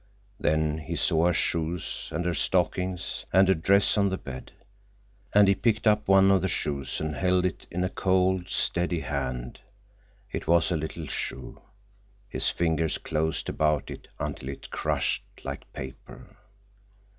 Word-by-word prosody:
Then 80 0 +1
he 75 - -5
saw 80 +2 +3
her 90 - +2
shoes 85 +1 0
and 85 +3 -2
her 90 - +1
stockings, 90 +1 0
and 95 +1 +5
a 95 - +5
dress 100 +5 +3
on 100 -1 +3
the 95 - -2
bed, 65 -5 -9 0.8
and 105 -1 +6
he 100 - +6
picked 110 +2 0
up 105 -1 +3
one 95 0 +6
of 95 - +4
the 95 - 0
shoes 70 -6 -2
and 80 -1 -2
held 90 +1 +2
it 90 - -3
in 90 +2 -2
a 90 - 0
cold, 95 -1 +1
steady 85 -1 +1
hand. 65 -4 -4 0.7
It - - -5
was 85 +1 +3
a - - +2
little 80 +1 -4
shoe. 65 -2 -4 0.7
His - - 0
fingers 80 -2 0
closed 80 0 -2
about 75 -2 0
it - - -10
until 65 - -4
it 70 - -8
crushed - - 0 0.2
like - - -7
paper. 65 0 -10
85 Hz, 155 wpm, -27 LUFS, 75-95 Hz, 0.8 s, and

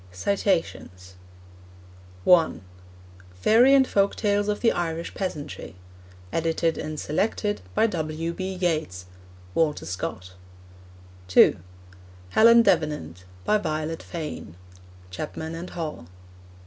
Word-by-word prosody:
(1) 170 - +4 0.7
Fairy 230 - +5
and 265 -1 +5
Folk 200 0 +2
Tales 205 -1 0
of 210 0 -1
the 230 - +4
Irish 165 -1 -3
Peasantry. 155 - -5 0.6
Edited 165 0 0
and 155 -1 -5
Selected 205 +6 -1
by - - +4
W. 165 -4 -2
B. 190 +1 -4
Yeats. 155 - -2 0.5
(Walter 155 +2 0
Scott.) 90 +1 -5 0.9
(2) 95 - +6 0.7
Helen 230 - +6
Davenant. 90 - 0 0.2
By 215 - +3
Violet 155 -2 -3
Fane. 155 - -7 0.6
(Chapman 95 - -5
and 170 +2 -6
Hall.) 155 - -6
165 Hz, 95 wpm, -25 LUFS, 150-200 Hz, 0.9 s, 2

